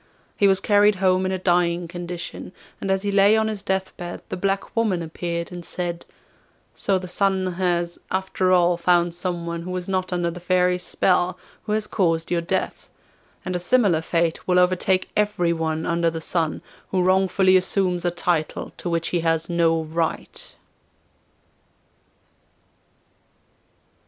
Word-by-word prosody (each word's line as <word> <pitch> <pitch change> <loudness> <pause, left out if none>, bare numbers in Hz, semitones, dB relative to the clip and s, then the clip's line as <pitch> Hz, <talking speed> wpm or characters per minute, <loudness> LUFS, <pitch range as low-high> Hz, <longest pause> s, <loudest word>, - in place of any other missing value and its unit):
He 200 - +4
was 190 -1 +4
carried 205 +1 +4
home 185 0 +2
in - - -2
a 190 - -1
dying 175 -1 +1
condition, 175 +1 -7 0.3
and 195 - -3
as 190 0 +1
he 205 - -1
lay 200 +2 +5
on 220 0 +1
his 215 -2 -3
death 190 -1 -2
bed 175 -1 -7
the - - -3
black 195 +1 -2
woman 210 -7 +1
appeared 170 +1 -4
and 175 -1 -7
said: 175 0 -4 0.7
'So 195 -2 0
the 185 0 -6
Sun 190 0 0
has, 175 -1 -1
after 190 0 0
all, 175 -1 +4
found 175 0 +2
someone, 170 -1 -4
who 175 - -7
was 180 -1 -4
not 185 -1 -1
under 175 -1 0
the 175 - -8
Fairy's 180 0 +1
spell, 180 0 +1 0.3
who 210 - -1
has 215 0 +1
caused 165 -6 0
your 170 -1 +1
death. 185 +3 -3 0.6
And 185 -1 -2
a - - 0
similar 185 -4 +3
fate 165 0 -1
will 180 -1 +3
overtake 185 +1 +2
everyone 170 -6 0
under 170 0 +1
the 165 0 -5
Sun 160 -1 -2 0.3
who 185 -1 +1
wrongfully 190 0 +3
assumes 185 -1 +1
a 175 - +2
title 175 -2 -2
to 175 - -4
which 170 0 -1
he 175 - 0
has 165 0 0
no 165 -1 +2
right. 160 +1 -3
180 Hz, 155 wpm, -23 LUFS, 170-190 Hz, 0.7 s, lay